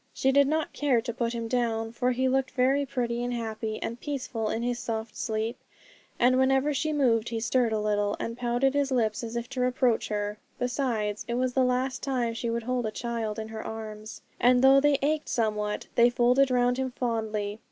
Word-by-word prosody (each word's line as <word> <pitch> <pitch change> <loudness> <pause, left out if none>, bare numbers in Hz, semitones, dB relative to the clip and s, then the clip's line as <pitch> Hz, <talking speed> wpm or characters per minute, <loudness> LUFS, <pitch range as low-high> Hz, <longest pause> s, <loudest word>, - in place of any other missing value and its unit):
She 265 - +2
did 280 0 +5
not 310 +1 -1
care 275 -5 +2
to 235 +1 -4
put 235 0 -1
him 230 -1 -3
down, 225 -2 -1
for 245 +2 0
he 260 +1 +1
looked 265 0 +1
very 270 +2 +1
pretty, 240 -2 -2
and 245 - -2
happy, 220 -2 -3
and 235 +1 -4
peaceful 250 -6 -3
in 230 - -2
his 245 0 -1
soft 220 -1 -4
sleep, 220 +2 -2 0.6
and 255 +1 +4
whenever 270 +2 +3
she 310 +3 -1
moved 240 -6 +2
he 230 -1 -2
stirred 240 +1 +1
a 220 - +1
little, 205 -1 0
and 230 - -3
pouted 245 +2 +1
his 285 -1 +1
lips 225 -3 0
as 230 0 -5
if 235 0 -3
to 265 -2 -3
reproach 250 -2 +1
her. 210 0 -3 0.2
Besides, 240 -5 -1
it 235 - -2
was 255 0 0
the 260 - +3
last 255 +1 0
time 250 -4 -1
she 230 +1 -3
would 230 0 -2
hold 250 -1 -1
a - - -3
child 230 -2 -3
in 220 0 -5
her 220 0 -6
arms; 215 -1 -7 0.2
and 250 +1 +4
though 270 +1 +7
they 290 -1 +4
ached 305 +1 0
somewhat, 210 -2 -1
they 235 0 +5
folded 250 +3 +3
round 245 0 +2
him 260 0 -1
fondly. 220 -4 -2
240 Hz, 210 wpm, -27 LUFS, 225-260 Hz, 0.6 s, though